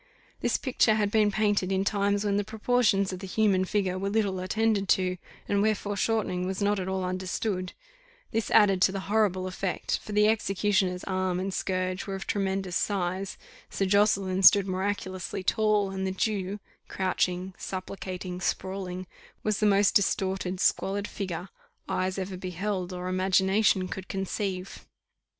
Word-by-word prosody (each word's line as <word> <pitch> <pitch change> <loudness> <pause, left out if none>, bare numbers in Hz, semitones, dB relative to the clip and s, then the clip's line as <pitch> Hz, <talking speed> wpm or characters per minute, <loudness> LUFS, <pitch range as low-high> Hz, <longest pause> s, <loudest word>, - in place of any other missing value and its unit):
This - - +1
picture 245 -4 +2
had 205 -2 +1
been 215 -1 +4
painted 205 -2 +1
in 190 0 +1
times 200 0 +1
when 200 -1 +1
the 205 - +1
proportions 215 -2 +1
of 185 - -6
the 195 - -7
human 190 -1 +2
figure 185 -2 -1
were 195 +1 -1
little 200 -3 0
attended 200 +1 0
to, 185 -1 +2 0.3
and 200 0 +2
when 215 +1 +3
foreshortening 200 -2 -1
was 190 0 -3
not 205 0 +1
at 185 - -3
all 190 0 -1
understood: 185 +1 -2 0.6
this 225 -1 -1
added 195 -4 +5
to 190 - +5
the 195 0 -4
horrible 200 -3 +1
effect, 185 0 -2
for 215 - -9
the 210 0 +4
executioner's 195 -3 +1
arm 185 -1 -1
and 190 +1 -3
scourge 185 0 -2
were 195 - -3
of 190 - -6
tremendous 195 -2 -1
size; 190 -1 -1 0.3
Sir 195 - -1
Josseline 195 -1 +2
stood 200 +1 +8
miraculously 190 -1 -3
tall, 210 -1 +2
and 190 0 -2
the - - -1
Jew, 200 0 -2 0.3
crouching, 185 0 -1
supplicating, 185 -1 -5
sprawling, 185 0 -3 0.4
was 215 -2 0
the 215 - +3
most 200 -1 +4
distorted 190 -2 0
squalid 200 +2 +1
figure, 185 -2 -5 0.4
eyes 185 +1 -1
ever 190 -1 -4
beheld, 185 +1 -3
or 180 0 -5
imagination 190 +1 +2
could 190 0 -6
conceive. 195 -1 -4
195 Hz, 155 wpm, -28 LUFS, 185-205 Hz, 0.6 s, stood